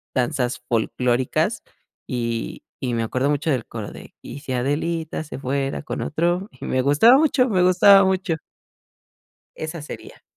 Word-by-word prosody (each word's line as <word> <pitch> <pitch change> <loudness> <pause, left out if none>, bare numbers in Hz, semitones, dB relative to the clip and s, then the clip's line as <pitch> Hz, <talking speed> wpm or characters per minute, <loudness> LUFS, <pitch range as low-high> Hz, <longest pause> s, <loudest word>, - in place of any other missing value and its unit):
danzas 125 -1 -1
folclóricas. 125 +2 0 0.4
Y 115 -2 -3 0.2
y 125 -2 -2
me 115 -1 0
acuerdo 125 +5 0
mucho 150 +2 -1
del 125 -4 -1
coro 110 -3 -7
de: - - -12
"Y - - -8
si 140 -3 -5
Adelita 155 +5 -2
se 150 - -8
fuera 135 +1 -2
con - - -4
otro", 175 +5 0
y 130 - -14
me 130 - +1
gustaba 150 - +6
mucho, 275 -4 +3
me 185 -3 +2
gustaba 195 +2 +7
mucho. 190 -3 0 1.2
Esa 155 +1 -5
sería. 150 - -10
145 Hz, 150 wpm, -22 LUFS, 125-175 Hz, 1.2 s, gustaba